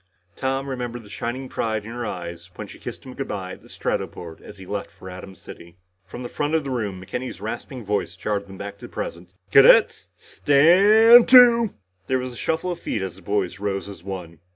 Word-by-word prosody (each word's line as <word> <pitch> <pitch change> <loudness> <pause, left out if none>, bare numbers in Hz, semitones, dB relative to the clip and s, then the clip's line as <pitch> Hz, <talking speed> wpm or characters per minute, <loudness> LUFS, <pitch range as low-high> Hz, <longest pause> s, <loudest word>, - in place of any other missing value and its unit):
Tom 135 +1 -2
remembered 120 -3 -5
the 105 - -15
shining 125 +5 -4
pride 110 -4 -2
in 115 - -8
her 120 -1 -4
eyes 85 -1 -7
when - - -6
she - - -13
kissed - - -8
him 130 - -9
good 135 - -5
bye 95 -3 -5
at - - -10
the - - -18
Stratoport 85 -2 -4
as 105 - -12
he 95 - -11
left 100 +1 -4
for 95 - -12
Atom 95 +1 -10
City. 85 -1 -13 0.3
From 120 +7 -8
the - - -4
front 145 +5 -2
of 160 - +1
the 135 - -5
room, 105 -7 -3
McKenny's 110 +6 -6
rasping 120 +3 -6
voice 100 -3 -2
jarred 100 +1 -3
him 95 0 -11
back 100 0 -8
to - - -9
the - - -22
present. 85 +2 -7 0.2
"Cadets - - +6
staaaaaaaand 205 +11 +6
to!" 235 -3 +7 0.3
There 130 - +1
was 130 -1 -5
a - - -11
shuffle 160 +8 -2
of 175 - -5
feet 110 - -3
as 95 -3 -5
the - - -15
boys 100 0 -2
rose 100 -1 -3
as 95 -4 -11
one. 90 -4 -7
110 Hz, 220 wpm, -23 LUFS, 95-135 Hz, 0.3 s, to